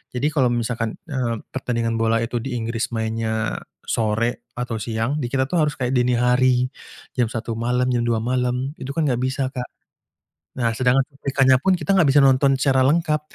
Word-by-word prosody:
Jadi 135 +4 +1
kalau 135 -5 +3
misalkan, 115 -1 -2
eee, 125 -6 -2 0.2
pertandingan 115 -3 -1
bola 115 0 +2
itu 120 +1 -2
di 125 +1 -4
Inggris 115 0 -2
mainnya 110 - -2 0.3
sore 115 +1 -1
atau 125 -2 -3
siang, 115 +6 -1
di 125 - -2
kita 130 -1 +1
tuh 175 - +1
harus 150 -1 -1
kayak 125 0 -1
dini 125 0 +2
hari, 125 +1 +3 0.5
jam 120 - +2
1.00 115 0 -4
malam, 125 +2 0
jam 120 - +1
2.00 115 -1 +1
malam, 125 +2 -1
itu 130 - -6
kan 165 - +1
enggak 125 -2 0
bisa, 130 +1 -1
Kak. 125 -2 -5 0.9
Nah, 115 -2 +1
sedangkan 130 +2 +3
cuplikannya 135 -1 +2
pun 190 +3 +3
kita 195 - -2
enggak 165 -7 +4
bisa 145 - +5
nonton 135 0 +4
secara 130 -1 +2
lengkap. 155 +1 +2
125 Hz, 185 wpm, -22 LUFS, 115-135 Hz, 0.9 s, bisa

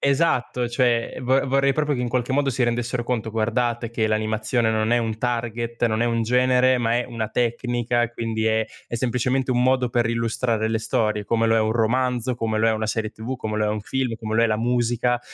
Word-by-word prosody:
esatto, 135 -4 +1
cioè 120 -1 +1
vo 130 +2 +2
vorrei 135 +1 +3
proprio 150 0 0
che 125 - -3
in 120 - -1
qualche 125 +1 -1
modo 140 0 +2
si 125 0 -1
rendessero 120 0 -1
conto: 115 -3 -2
"Guardate 115 +1 -1
che 110 -2 0
l'animazione 110 +2 0
non 110 +1 +1
è 120 - +4
un 110 -1 -2
target, 120 -1 -2
non 110 0 0
è - - +2
un 115 -1 0
genere, 125 +2 +3
ma 115 0 +1
è 125 - -1
una 110 -2 -4
tecnica, 120 0 0
quindi 115 -1 -2
è 110 0 +2 0.2
è - - -6
semplicemente 130 +2 0
un 125 0 +2
modo 130 -1 +2
per 120 -1 +1
illustrare 115 -1 0
le 110 0 0
storie, 105 -2 -1
come 115 +1 +1
lo 115 0 +3
è - - +3
un 110 0 +1
romanzo, 125 +2 0
come 110 -2 -1
lo 115 +1 +3
è - - +3
una 110 0 -2
serie 110 0 -2
TV, 115 +3 -6
come 110 -3 -4
lo 110 - +1
è - - 0
un 105 0 -2
film, 130 +2 -2
come 110 0 -3
lo 115 - +4
è - - +5
la 110 -1 0
musica". 120 +1 +1
120 Hz, 225 wpm, -23 LUFS, 110-125 Hz, 0.2 s, è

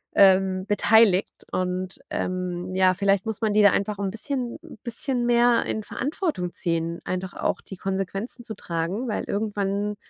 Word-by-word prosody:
ähm, 190 -1 +5
beteiligt 210 -2 +4 0.2
und, 185 0 -2
ähm, 180 0 -3
ja, 185 0 +4
vielleicht 195 0 +2
muss 220 0 -3
man 215 -2 +1
die 210 - +5
da 205 - +7
einfach 200 0 -1
'n 200 -1 -1
bisschen 245 +3 -3
'n 330 - -12
bisschen 245 +1 -2
mehr 240 0 +4
in 220 - -2
Verantwortung 270 - -2
ziehen, 165 -1 -2
einfach 185 0 -3
auch - - -1
die 190 - -10
Konsequenzen 195 +6 -3
zu 220 -2 -7
tragen, 175 +7 -3
weil 215 - -2
irgendwann 205 0 -1
200 Hz, 160 wpm, -25 LUFS, 185-225 Hz, 0.2 s, da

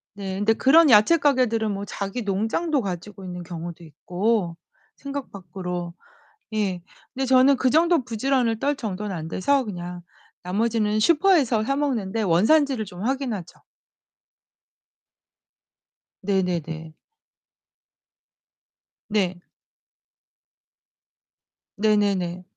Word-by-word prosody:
네, 195 -2 -5
근데 205 +3 +2
그런 300 +7 +5
야채 220 +9 +6
가게들은 250 -7 +1
뭐 200 0 -4
자기 200 +4 -4
농장도 225 - 0
가지고 195 0 -6
있는 180 -1 -7
경우도 170 0 -8
있고, 175 +4 -2 0.4
생각 280 -1 -6
밖으로. 180 -2 -6 0.6
예. 195 -5 -1 0.3
근데 265 +1 -2
저는 260 +1 +5
그 255 - +2
정도 325 0 +3
부지런을 240 -1 0
떨 285 +3 0
정도는 210 -5 -4
안 160 -1 -5
돼서 270 +11 +1
그냥 180 -3 -6 0.4
나머지는 215 +3 0
슈퍼에서 295 - +3
사 275 +5 0
먹는데, 230 -7 -1
원산지를 220 - +3
좀 180 -1 -9
확인하죠. 245 - -3 2.6
네네네. 175 -5 -2 2.2
네. 185 -4 0 2.4
네네네. 200 -4 +1
210 Hz, 215 characters per minute, -24 LUFS, 180-260 Hz, 2.6 s, 야채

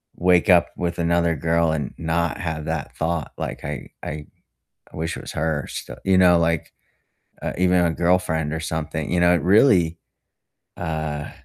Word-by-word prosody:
wake 90 +2 +3
up 90 -2 +6
with 85 0 -2
another 85 0 +2
girl 85 +2 +1
and 75 -4 -3
not 85 +1 -1
have 80 -5 -4
that - - -4
thought- 80 0 -2
like, - - -5
I 70 -3 -5
I 75 -1 -5 0.7
I - - -11
wish 80 +1 -2
it - - -7
was - - -8
her 75 -2 -1
still - - -7
you 95 -1 +4
know, 90 -2 +6
like, 85 -1 0 0.7
uh - - -3
even 90 -1 +3
a 85 - +2
girlfriend 80 -3 +1
or 80 - -2
something, 80 -1 -3
you 90 - +2
know, 90 0 +5
it 85 - +1
really, 90 -5 +4 0.8
uh 80 -3 -3
85 Hz, 175 wpm, -22 LUFS, 80-90 Hz, 0.8 s, up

